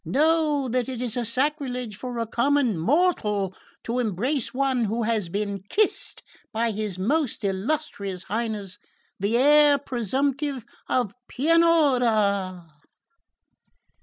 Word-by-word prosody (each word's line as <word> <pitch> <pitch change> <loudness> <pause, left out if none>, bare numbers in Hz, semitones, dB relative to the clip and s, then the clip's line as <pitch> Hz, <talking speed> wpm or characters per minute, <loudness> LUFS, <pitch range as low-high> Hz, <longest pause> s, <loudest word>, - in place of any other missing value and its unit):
Know 305 -1 +2
that 250 +1 -1
it 255 -3 -5
is 245 -3 -1 0.2
sacrilege 255 -4 -1
for 245 +3 -6
a 230 - -1
common 250 0 +1
mortal 210 - +1 0.3
to 240 +2 -2
embrace 240 - -1
one 260 -2 +1
who 225 +3 -1
has 215 -5 0
been 200 +1 -3
kissed 425 0 0 0.3
by 230 +1 0
his 210 -3 -4
most 260 +6 0
illustrious 200 - -2
Highness 210 -3 -3 0.4
the 205 +4 +1
Heir 295 +2 +6
presumptive 270 +2 -2 0.2
of 245 -6 0
Pianura!" 245 - +2
240 Hz, 110 wpm, -25 LUFS, 210-285 Hz, 0.4 s, Heir